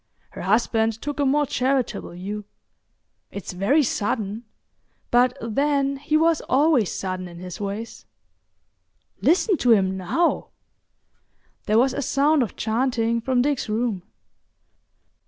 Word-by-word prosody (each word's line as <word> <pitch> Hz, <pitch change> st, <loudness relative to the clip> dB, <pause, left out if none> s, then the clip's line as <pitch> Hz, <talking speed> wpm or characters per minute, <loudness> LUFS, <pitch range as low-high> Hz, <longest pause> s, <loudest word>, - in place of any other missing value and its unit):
Her -, -, -8 dB
husband 225 Hz, +2 st, +1 dB
took 290 Hz, +2 st, -5 dB
a 285 Hz, -, +2 dB
more 295 Hz, +2 st, +2 dB
charitable 260 Hz, -7 st, -1 dB
view. 200 Hz, +4 st, -6 dB, 0.8 s
"It's 200 Hz, -2 st, -7 dB
very 245 Hz, -, +2 dB
sudden—but 230 Hz, +3 st, -2 dB
then 275 Hz, +4 st, 0 dB
he 300 Hz, +2 st, +1 dB
was 325 Hz, 0 st, +3 dB
always 270 Hz, -, +3 dB
sudden 185 Hz, -1 st, -4 dB
in 170 Hz, -1 st, -11 dB
his 180 Hz, +2 st, -8 dB
ways. 205 Hz, +3 st, -6 dB, 1.1 s
Listen 370 Hz, +3 st, +3 dB
to 245 Hz, -4 st, +4 dB
him 190 Hz, -3 st, +2 dB
now!" 190 Hz, -, 0 dB, 1.2 s
There 215 Hz, -, +3 dB
was 255 Hz, +2 st, +3 dB
a -, -, -2 dB
sound 285 Hz, +3 st, +2 dB
of 230 Hz, -, -2 dB
chanting 230 Hz, 0 st, 0 dB
from 250 Hz, 0 st, +1 dB
Dick's 285 Hz, -5 st, -1 dB
room. 220 Hz, -3 st, -1 dB
235 Hz, 120 wpm, -23 LUFS, 210-275 Hz, 1.2 s, to